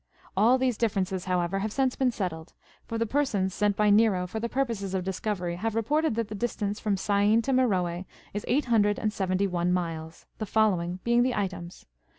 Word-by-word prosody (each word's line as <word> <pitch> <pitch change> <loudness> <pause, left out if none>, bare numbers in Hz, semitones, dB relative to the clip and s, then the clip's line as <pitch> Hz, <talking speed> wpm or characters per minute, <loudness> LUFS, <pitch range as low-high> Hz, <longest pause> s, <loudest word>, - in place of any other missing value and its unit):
All 225 +6 +5
these 255 -3 0
difi'erences, 195 -5 -1
how 180 -1 +1
ever, 175 +3 -1
have 215 +2 -2
since 265 +1 +1
been 260 -2 +2
settled; 175 -8 -4 0.3
for 230 - -3
the 230 - +1
persons 210 -8 0
sent 205 0 +1
by 210 0 +3
Xero 205 -4 +3
for 220 +5 -4
the 235 +1 -3
purposes 230 -8 -2
of 185 - -1
discovery 185 -2 -3
have 220 +3 -2
reported 290 +4 +1
that 230 -2 -1
the 215 - -7
distance 210 -2 -2
from 205 -3 0
Syene 205 +3 +2
to 270 - -1
!M!eroe 185 -9 +1 0.3
is 205 - -3
eight 270 +5 +2
hundred 210 -4 +3
and 215 -1 -1
seventy 190 -1 0
one 180 -2 0
miles, 165 -2 -3
the 215 - -2
follo 215 -2 +3
^ing 175 +1 -4
being 235 0 +3
the 250 0 +1
items. 180 -3 -4
205 Hz, 205 wpm, -27 LUFS, 185-230 Hz, 0.3 s, All